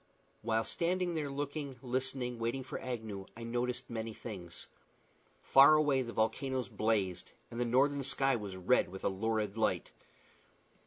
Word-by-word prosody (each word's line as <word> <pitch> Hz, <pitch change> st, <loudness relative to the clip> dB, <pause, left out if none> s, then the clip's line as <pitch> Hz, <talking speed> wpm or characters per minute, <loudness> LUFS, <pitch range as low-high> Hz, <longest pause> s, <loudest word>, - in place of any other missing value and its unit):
While 115 Hz, 0 st, +1 dB
standing 180 Hz, +1 st, 0 dB
there 150 Hz, -3 st, -2 dB
looking, 140 Hz, 0 st, -4 dB
listening, 125 Hz, -1 st, -1 dB
waiting 120 Hz, +4 st, -1 dB
for 130 Hz, -, -6 dB
Agnew, 110 Hz, -6 st, -5 dB
I 115 Hz, -, -7 dB
noticed 125 Hz, +2 st, -2 dB
many 115 Hz, -1 st, -4 dB
things. 90 Hz, -7 st, -8 dB, 0.8 s
Far 140 Hz, +3 st, +8 dB
away 145 Hz, -3 st, +3 dB
the 120 Hz, -2 st, -4 dB
volcanoes 120 Hz, +2 st, 0 dB
blazed, 105 Hz, -5 st, -1 dB, 0.2 s
and 115 Hz, -, -5 dB
the 120 Hz, -, +2 dB
northern 140 Hz, +4 st, +3 dB
sky 135 Hz, 0 st, +2 dB
was 100 Hz, -4 st, -5 dB
red 95 Hz, +7 st, +2 dB
with 95 Hz, +1 st, -9 dB
a -, -, +2 dB
lurid 110 Hz, +1 st, -1 dB
light. 110 Hz, -, 0 dB
120 Hz, 150 wpm, -33 LUFS, 110-135 Hz, 0.8 s, Far